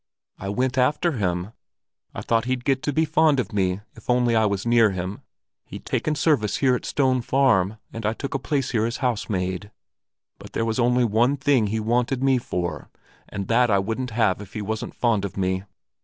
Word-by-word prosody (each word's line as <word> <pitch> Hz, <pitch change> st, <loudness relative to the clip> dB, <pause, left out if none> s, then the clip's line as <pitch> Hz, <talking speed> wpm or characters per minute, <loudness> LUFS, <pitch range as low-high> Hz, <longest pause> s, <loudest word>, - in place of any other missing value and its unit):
"I 100 Hz, -, -5 dB
went 130 Hz, +5 st, 0 dB
after 150 Hz, +7 st, +2 dB
him. 90 Hz, -, -2 dB, 0.6 s
I -, -, -4 dB
thought 115 Hz, 0 st, +1 dB
he'd 125 Hz, -1 st, -2 dB
get 135 Hz, -2 st, +1 dB
to 145 Hz, -, -1 dB
be 160 Hz, +3 st, +2 dB
fond 155 Hz, -3 st, +3 dB
of 110 Hz, -6 st, -3 dB
me, 95 Hz, -1 st, 0 dB
if -, -, -17 dB
only 120 Hz, -1 st, +3 dB
I 110 Hz, -1 st, +4 dB
was 100 Hz, 0 st, -2 dB
near 115 Hz, -2 st, +5 dB
him. 95 Hz, +1 st, -5 dB, 0.4 s
He'd -, -, -10 dB
taken 155 Hz, -, -1 dB
service 125 Hz, -, +1 dB
here 130 Hz, -2 st, +3 dB
at 125 Hz, -, -2 dB
Stone 130 Hz, -3 st, +1 dB
Farm, 115 Hz, -7 st, +2 dB, 0.2 s
and 115 Hz, -, -6 dB
I 105 Hz, +1 st, +1 dB
took 140 Hz, +4 st, -5 dB
a 135 Hz, -, -1 dB
place 135 Hz, -1 st, -1 dB
here 110 Hz, -2 st, +1 dB
as 115 Hz, -, -4 dB
housemaid; 100 Hz, -5 st, -2 dB, 0.7 s
but -, -, -12 dB
there 115 Hz, -, 0 dB
was 115 Hz, +1 st, -1 dB
only 125 Hz, 0 st, +3 dB
one 120 Hz, +6 st, +2 dB
thing 135 Hz, -5 st, +2 dB
he 110 Hz, +2 st, -1 dB
wanted 120 Hz, +4 st, 0 dB
me 135 Hz, -2 st, +3 dB
for, 90 Hz, -7 st, -4 dB, 0.4 s
and 100 Hz, -1 st, -5 dB
that 120 Hz, +1 st, +4 dB
I 100 Hz, -, +4 dB
wouldn't 115 Hz, +6 st, -2 dB
have 105 Hz, -4 st, +1 dB
if 100 Hz, -1 st, -11 dB
he 105 Hz, -, -4 dB
wasn't 110 Hz, +2 st, -4 dB
fond 115 Hz, -5 st, +1 dB
of 100 Hz, -2 st, -5 dB
me. 95 Hz, 0 st, -1 dB
115 Hz, 205 wpm, -24 LUFS, 100-130 Hz, 0.7 s, near